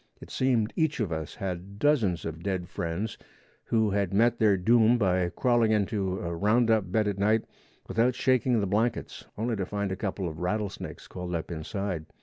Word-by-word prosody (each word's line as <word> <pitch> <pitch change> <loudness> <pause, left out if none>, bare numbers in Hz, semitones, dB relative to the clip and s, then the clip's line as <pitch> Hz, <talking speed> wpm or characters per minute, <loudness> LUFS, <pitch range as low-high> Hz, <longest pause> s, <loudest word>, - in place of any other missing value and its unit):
It - - -12
seemed 120 -4 +1
each 160 -4 +1
of 105 -7 -1
us 80 -2 -4
had 95 +1 -5
dozens 110 - +2
of 80 0 -5
dead 95 -2 -2
friends 85 +8 -4 0.5
who 110 -2 +2
had 100 -1 0
met 120 +3 +3
their 105 -3 +4
doom 115 +5 +4
by 90 -4 +1
crawling 120 +2 +2
into 100 -3 0
a 85 0 -3
roundup 110 0 +2
bed 110 0 +2
at 100 -1 -2
night 105 +2 +2 0.4
without 120 +2 +2
shaking 130 -2 +2
the - - 0
blankets 105 +5 -1
only 115 +2 -1
to 95 -2 -2
find 100 -1 -2
a - - -1
couple 95 -1 -3
of 80 -1 -6
rattle 105 +3 -1
snakes - - -8
coiled 90 -1 -5
up 80 +1 -4
inside. 85 0 -4
100 Hz, 185 wpm, -28 LUFS, 90-115 Hz, 0.5 s, their